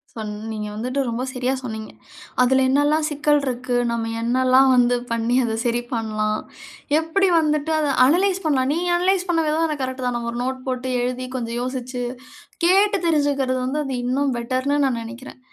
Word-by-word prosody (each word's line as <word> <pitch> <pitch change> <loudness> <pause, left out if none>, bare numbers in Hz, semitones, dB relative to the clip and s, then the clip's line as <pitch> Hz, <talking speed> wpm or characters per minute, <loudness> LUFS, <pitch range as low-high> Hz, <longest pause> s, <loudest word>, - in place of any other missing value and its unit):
சொன்ன 215 -1 -6
நீங்க 210 -1 -4
வந்துட்டு 250 +5 -3
ரொம்ப 235 +2 -2
சரியா 255 0 -1
சொன்னீங்க. 220 -3 -6 0.5
அதில 265 +1 +4
என்னலாம் 290 +3 +2
சிக்கல் 295 0 +2
இருக்கு, 250 -1 -2 0.2
நம்ம 225 -1 -2
என்னல்லாம் 255 +2 +4
வந்து 245 0 +4 0.2
பண்ணி, 230 +1 0
அத 225 -2 -1
சரி 240 0 +1
பண்ணலாம். 215 -2 -1 0.6
எப்படி 355 +5 +1
வந்துட்டு, 305 0 0
அத 300 -2 0 0.2
அனலைஸ் 370 +6 +2
பண்ணலாம்? 265 -3 +2
நீங்க 350 +2 -1
அனலைஸ் 370 +1 +1
பண்ண 330 -1 +2
விதம், 315 +2 +1
எனக்கு 295 -4 -3
கரெக்ட்தான். 255 -1 -2
நம்ம 235 0 -4
ஒரு 240 - -5
நோட் 260 0 -2
போட்டு 255 0 -2
எழுதி 255 +1 -2
கொஞ்சம் 235 -1 -3
யோசிச்சு 255 -1 -4 0.6
கேட்டு 395 +3 +4
தெரிஞ்சுக்கிறது 280 -4 +1
வந்து, 285 +4 -1
அது 265 -1 -3
இன்னும் 270 +1 0
பெட்டர்ன்னு 260 +4 -1
நா 265 - +2
நினைக்கிறேன். 240 +3 -10
260 Hz, 165 wpm, -22 LUFS, 240-295 Hz, 0.6 s, அதில